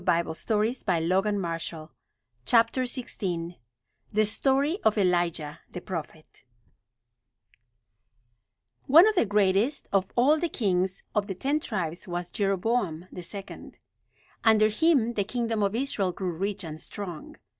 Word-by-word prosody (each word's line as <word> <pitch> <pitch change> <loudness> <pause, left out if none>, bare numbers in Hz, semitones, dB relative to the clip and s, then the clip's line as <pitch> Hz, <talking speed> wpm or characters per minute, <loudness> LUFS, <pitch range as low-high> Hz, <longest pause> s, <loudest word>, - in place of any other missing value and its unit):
[Illustration: 180 +7 +1
Ship 250 - -8
in 165 -2 +1
Solomon's 185 -3 0 1.4
time] 175 -4 -3 0.6
THE 215 +1 +3
STORY 275 - +1
OF 220 0 +2
ELIJAH, 175 -5 0
THE 180 - -6
PROPHET 165 -5 -8 2.4
One 330 +9 +8
of 435 - +3
the 355 - +2
greatest 205 +7 +2
of 195 -1 +2
all 285 +6 +4
the 340 +1 -1
kings 185 -7 -1
of 205 -1 0
the 190 - -4
Ten 280 +10 0
Tribes 185 - -4
was 175 0 -4
Jeroboam 195 -3 0
the 180 - -7
second. 195 +3 -8 0.7
Under 215 -1 +5
him 245 -1 +2
the 205 - 0
kingdom 230 0 -2
of 200 +1 +1
Israel 230 -7 0
grew 185 0 -3
rich 195 +4 -3
and 155 -1 -6
strong. 180 -7 -7
200 Hz, 125 wpm, -27 LUFS, 175-230 Hz, 2.4 s, One